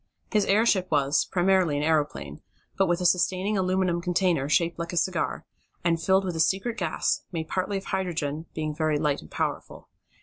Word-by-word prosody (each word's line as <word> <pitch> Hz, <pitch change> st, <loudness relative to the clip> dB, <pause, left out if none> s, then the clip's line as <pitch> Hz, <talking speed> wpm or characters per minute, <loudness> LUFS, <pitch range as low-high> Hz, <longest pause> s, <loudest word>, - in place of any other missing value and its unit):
His 210 Hz, -2 st, +2 dB
airship 200 Hz, -3 st, +2 dB
was, 145 Hz, -1 st, +2 dB
primarily 180 Hz, -4 st, +2 dB
an 145 Hz, -, -1 dB
aeroplane, 145 Hz, -, -1 dB, 0.3 s
but 195 Hz, 0 st, +2 dB
with 175 Hz, +1 st, 0 dB
a -, -, -1 dB
sustaining 185 Hz, +3 st, +2 dB
aluminum 185 Hz, -2 st, +1 dB
container, 175 Hz, -5 st, +1 dB
shaped 170 Hz, +2 st, +1 dB
like 170 Hz, 0 st, -4 dB
a 175 Hz, -, -4 dB
cigar, 175 Hz, -1 st, -1 dB, 0.4 s
and 165 Hz, -1 st, +1 dB
filled 190 Hz, +3 st, +3 dB
with 180 Hz, -2 st, -3 dB
a -, -, -3 dB
secret 195 Hz, +8 st, +1 dB
gas, -, -, 0 dB
made 160 Hz, -3 st, -4 dB
partly 195 Hz, +2 st, -1 dB
of 195 Hz, -, -7 dB
hydrogen, 165 Hz, -5 st, -3 dB
being 155 Hz, -1 st, -2 dB
very 155 Hz, 0 st, 0 dB
light 145 Hz, -1 st, 0 dB
and 75 Hz, -, -14 dB
powerful. -, -, -4 dB
175 Hz, 180 wpm, -26 LUFS, 155-190 Hz, 0.4 s, filled